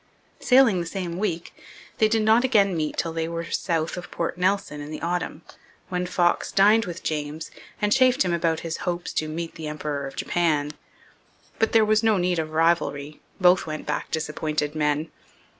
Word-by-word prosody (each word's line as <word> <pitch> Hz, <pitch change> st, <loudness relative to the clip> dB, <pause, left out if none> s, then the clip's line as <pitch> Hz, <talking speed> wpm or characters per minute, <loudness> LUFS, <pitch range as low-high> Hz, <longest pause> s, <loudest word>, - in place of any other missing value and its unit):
Sailing 250 Hz, -7 st, +5 dB
the 170 Hz, -, -3 dB
same 180 Hz, -2 st, -4 dB
week, 175 Hz, -5 st, -3 dB, 0.5 s
they 220 Hz, -, +5 dB
did 220 Hz, 0 st, +1 dB
not 220 Hz, +3 st, +4 dB
again 205 Hz, -7 st, +3 dB
meet 155 Hz, -2 st, -2 dB
till 165 Hz, -, -1 dB
they 165 Hz, 0 st, -2 dB
were 165 Hz, 0 st, -4 dB
south 165 Hz, -2 st, -1 dB
of 175 Hz, -, -7 dB
Port 170 Hz, -, -3 dB
Nelson 180 Hz, -4 st, 0 dB
in 145 Hz, -, -7 dB
the 155 Hz, -, -6 dB
autumn, 175 Hz, -2 st, -2 dB, 0.5 s
when 180 Hz, 0 st, -2 dB
Fox 175 Hz, -1 st, +1 dB
dined 210 Hz, +3 st, +5 dB
with 180 Hz, 0 st, -7 dB
James 150 Hz, 0 st, -4 dB, 0.3 s
and 210 Hz, -1 st, +2 dB
chaffed 255 Hz, -4 st, +4 dB
him 175 Hz, -, 0 dB
about 165 Hz, -1 st, 0 dB
his 165 Hz, -1 st, -4 dB
hopes 175 Hz, -1 st, -3 dB
to 155 Hz, -, -1 dB
'meet 165 Hz, +1 st, -5 dB
the 160 Hz, -1 st, -7 dB
Emperor 150 Hz, -2 st, -4 dB
of 135 Hz, -, -10 dB
Japan.' 155 Hz, -4 st, 0 dB, 0.9 s
But 225 Hz, -, +1 dB
there 225 Hz, -1 st, +6 dB
was 215 Hz, 0 st, +3 dB
no 220 Hz, -2 st, +3 dB
need 180 Hz, -1 st, +1 dB
of 155 Hz, -1 st, -2 dB
rivalry; 155 Hz, -2 st, 0 dB, 0.2 s
both 180 Hz, -2 st, +4 dB
went 155 Hz, 0 st, -5 dB
back 150 Hz, -, -3 dB
disappointed 150 Hz, -1 st, -2 dB
men. 150 Hz, 0 st, 0 dB
170 Hz, 185 wpm, -24 LUFS, 155-195 Hz, 0.9 s, there